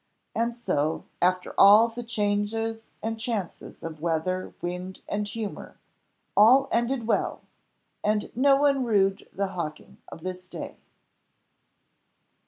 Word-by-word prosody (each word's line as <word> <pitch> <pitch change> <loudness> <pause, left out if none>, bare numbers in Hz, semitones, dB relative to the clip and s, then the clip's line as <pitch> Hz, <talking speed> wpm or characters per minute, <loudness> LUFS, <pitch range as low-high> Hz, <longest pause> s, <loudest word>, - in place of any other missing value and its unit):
And 235 +1 -1
so, 155 -8 -1 0.2
after 180 0 +1
all 210 +3 +8
the 235 +1 -7
changes 225 0 -1 0.2
and 225 0 -2
chances 220 -6 -4
of 160 -2 -7
weather, 170 +3 -1
wind, 180 +2 -5
and 205 0 -2
humour, 210 0 -6 0.6
all 255 +6 +7
ended 235 +1 0
well, 230 - 0 0.6
and 210 +1 0
no 275 +3 +5
one 275 -1 +3
rued 195 -4 +1
the 200 0 -2
hawking 170 -5 -6
of 165 - -10
this 185 0 -5
day. - - -7
210 Hz, 120 wpm, -26 LUFS, 185-230 Hz, 0.6 s, all